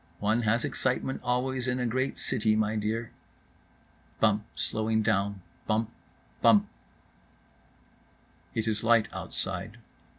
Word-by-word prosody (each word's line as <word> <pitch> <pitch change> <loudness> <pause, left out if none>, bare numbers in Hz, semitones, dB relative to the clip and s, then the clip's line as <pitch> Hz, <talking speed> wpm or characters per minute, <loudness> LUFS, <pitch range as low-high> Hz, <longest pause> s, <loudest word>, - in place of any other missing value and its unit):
—"One 110 +3 +1
has 115 +1 +2
excitement 130 +1 -1
always 125 +1 0
in 125 0 0
a 125 - 0
great 130 +3 -1
city, 110 -2 +1
my 110 0 +1
dear."— 110 +2 -2 1.1
Bump, 105 0 +2
slowing 110 0 0
down. 100 -3 0 0.2
BUMP—BUMP. 110 0 +1 1.9
It 115 -1 -1
is 110 -1 0
light 115 -2 +4
outside. - - -4
110 Hz, 105 wpm, -29 LUFS, 110-120 Hz, 1.9 s, light